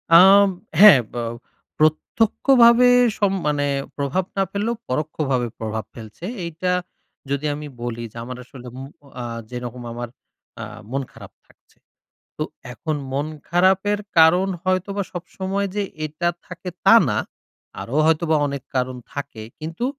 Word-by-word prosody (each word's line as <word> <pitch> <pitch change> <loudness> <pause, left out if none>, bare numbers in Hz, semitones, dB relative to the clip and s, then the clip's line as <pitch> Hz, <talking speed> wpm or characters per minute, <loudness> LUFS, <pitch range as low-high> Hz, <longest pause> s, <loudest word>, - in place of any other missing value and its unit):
আম 195 +3 +8 0.3
হ্যাঁ। 205 -9 +10
বা 120 - -3 0.6
প্রত্যক্ষভাবে 235 - +4 0.3
সব 200 -2 +2 0.2
মানে 145 -1 +1 0.3
প্রভাব 145 +6 0
না 195 - +3
ফেললেও, 215 +4 -1
পরোক্ষভাবে 135 -3 -1
প্রভাব 110 0 -3
ফেলছে। 110 +7 -10 0.2
এইটা 170 +2 -2 0.6
যদি 140 +2 -1
আমি 150 0 -7
বলি 120 -1 -4
যে, 115 - -13
আমার 125 +1 -7
আসলে 125 0 -12
ম - - -7 0.4
আ - - -4 0.3
যেরকম 125 0 -6
আমার 120 0 -5 0.5
আ - - -4 0.3
মন 135 +1 -1
খারাপ - - -13 0.2
থাকছে। - - -28 0.6
তো - - -2 0.3
এখন 155 +4 -3 0.2
মন 140 +2 -1 0.2
খারাপের 190 +4 +3 0.2
কারণ 175 +4 +6 0.2
হয়তোবা 185 +2 0
সবসময় 190 +3 -3
যে 205 - 0 0.2
এটা 155 +3 -1 0.2
থাকে, 180 0 -8 0.2
তা - - +8
না। - - 0 0.6
আরো 125 - -4
হয়তোবা 160 0 +2
অনেক 140 -2 -4
কারণ 130 0 -1 0.2
থাকে। 140 -6 -6 0.2
কিন্তু, 165 +8 -4
155 Hz, 135 wpm, -22 LUFS, 130-190 Hz, 0.6 s, হ্যাঁ